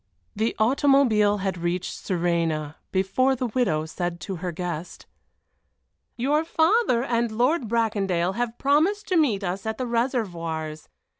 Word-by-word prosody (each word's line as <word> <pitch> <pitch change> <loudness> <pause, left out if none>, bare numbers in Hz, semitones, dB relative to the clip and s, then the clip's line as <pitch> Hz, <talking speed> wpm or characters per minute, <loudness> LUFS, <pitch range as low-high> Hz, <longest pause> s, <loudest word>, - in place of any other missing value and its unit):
The 220 +2 0
automobile 230 -3 +3
had 190 -2 -2
almost 170 - -8
reached 175 +1 -1
Suresnes 165 -4 -1 0.2
before 230 +8 +2
the 255 0 -2
widow 215 -10 0
said 175 +1 -4
to 190 +3 -5
her 180 +1 -4
guest: 175 0 -5 1.1
"Your 290 +6 +1
father 325 - +2
and 235 -2 0
Lord 245 +4 +1
Bracondale 200 -6 0
have 240 +1 -3
promised 320 +10 +2
to 370 - +1
meet 245 - +2
us 190 +1 -3
at 220 - -2
the 255 - -2
Réservoirs. 175 - -2
215 Hz, 140 wpm, -25 LUFS, 175-255 Hz, 1.1 s, automobile